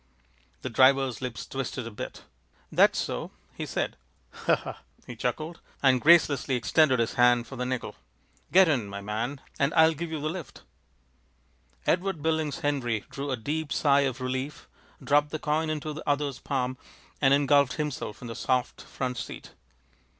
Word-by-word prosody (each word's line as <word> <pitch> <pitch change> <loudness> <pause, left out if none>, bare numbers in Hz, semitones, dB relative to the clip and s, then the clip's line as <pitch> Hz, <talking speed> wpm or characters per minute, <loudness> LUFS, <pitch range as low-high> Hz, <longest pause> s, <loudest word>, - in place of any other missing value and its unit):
The 130 - -2
driver's 130 +1 +4
lips 125 -2 -5
twisted 130 -2 -4
a 115 - -6
bit. 105 - -7 0.5
"That's - - +5
so," - - -3 0.2
he - - -5
said. - - -2 0.3
"Huh!" - - -1 0.3
he 125 - -8
chuckled, 155 +8 -3 0.2
and 130 -2 +5
gracelessly 150 -5 +5
extended 130 +4 +3
his 115 -1 0
hand 120 -1 +5
for 135 - -9
the 125 0 -3
nickel. 130 -1 -3 0.6
"Get 190 0 +7
in, 130 -9 +1
my 100 0 -6
man, 115 +7 -3 0.2
and 140 +1 +2
I'll 160 0 +6
give 165 +2 -5
you 160 -1 -3
the 150 - -2
lift." 165 -3 -7 1.2
Edward 180 -2 0
Billings 160 -2 0
Henry 120 -7 -1
drew 140 +1 -4
a 130 - -1
deep 150 +6 -3
sigh 140 -1 +4
of 135 -2 -1
relief 130 +3 -4 0.4
dropped 145 +1 +3
the 155 - -3
coin 155 +1 0
into 155 0 -3
the 150 - -5
other's 145 -2 0
palm, 130 -2 -2 0.4
and 135 -2 +5
engulfed 140 -1 +4
himself 145 -7 -4
in - - -6
the 115 - -5
soft 125 +2 -1
front 125 -1 -4
seat. 105 - -7
140 Hz, 165 wpm, -27 LUFS, 125-150 Hz, 1.2 s, Get